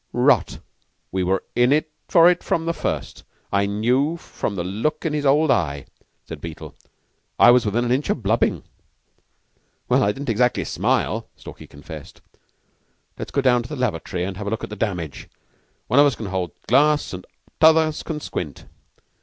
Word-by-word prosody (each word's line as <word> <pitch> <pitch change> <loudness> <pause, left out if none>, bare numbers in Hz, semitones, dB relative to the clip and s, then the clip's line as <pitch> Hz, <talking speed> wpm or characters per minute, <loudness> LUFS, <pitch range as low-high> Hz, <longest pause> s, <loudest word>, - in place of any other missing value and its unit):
"Rot! 125 -2 +2 0.5
We 95 - -1
were 95 +1 0
in 125 +5 +4 0.3
for 170 -1 +6
it 180 0 +3
from 165 - -1
the 170 - 0
first. - - -4 0.3
I 100 0 +2
knew 125 +10 +1
the 100 - -4
look 115 - -2
of 160 - 0
his 145 -1 0
old 150 +2 +4
eye," 75 - 0 0.4
said - - -8
Beetle. 85 -2 -8 0.6
"I 120 - +8
was 125 -3 +3
within 120 +4 0
an 120 - -1
inch 135 +4 0
of 115 - -1
blubbing." 110 +4 +1 1.2
"Well, - - +3
I 100 - +3
didn't 135 +4 -6
exactly 125 +3 +1
smile," - - -1
Stalky - - -12
confessed. 75 +1 -11 1.0
"Let's - - -5
go 140 - 0
down 125 -2 +3
to 120 - -10
the 150 - -5
lavatory 95 - -2
and 95 0 -4
have 100 - -6
a - - 0
look 110 - -3
at - - -6
the - - -5
damage. 90 -10 -4 0.6
One 125 - +3
of 145 - +7
us 140 - 0
can 110 - -7
hold 90 -4 -3
the - - -32
glass 145 +2 +3
and 90 0 -6 0.4
t'others 160 -1 +4
can 160 -2 -5
squint." 75 - -6
120 Hz, 180 wpm, -22 LUFS, 95-145 Hz, 1.2 s, I